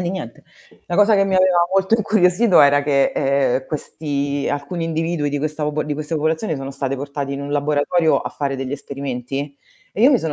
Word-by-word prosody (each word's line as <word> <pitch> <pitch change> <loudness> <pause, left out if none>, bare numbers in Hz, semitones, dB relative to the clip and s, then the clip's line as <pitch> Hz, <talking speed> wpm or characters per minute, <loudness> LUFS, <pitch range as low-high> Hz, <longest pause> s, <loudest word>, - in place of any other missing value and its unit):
e - - -1
di 175 - -2
niente. 180 -12 -7 0.4
La 175 - -2
cosa 205 +2 +5
che 195 -1 +3
mi 190 - 0
aveva 185 -1 +4 0.2
molto 195 +2 +1
incuriosito, 210 -1 +3
era 145 0 +6
che, 140 -1 +2
ehm, 135 -2 +1
questi 145 -2 -3
alcuni 145 +4 -3
individui 165 -2 -1
di 145 - -2
questa 155 +1 -3
popo 150 0 -1
di 150 - -3
questa 150 +2 -4
popolazione 160 +3 -1
sono 135 0 -6
state 135 0 -3
portati 140 0 -4
in 140 - -5
un 140 - -6
laboratorio 150 +3 +2
a - - -6
fare 140 -2 -3
degli 135 0 -4
esperimenti, 140 0 -5 0.4
e - - -5
io 255 +5 +7
mi 260 - +4
sono 160 -5 -3
150 Hz, 210 wpm, -20 LUFS, 140-175 Hz, 0.4 s, io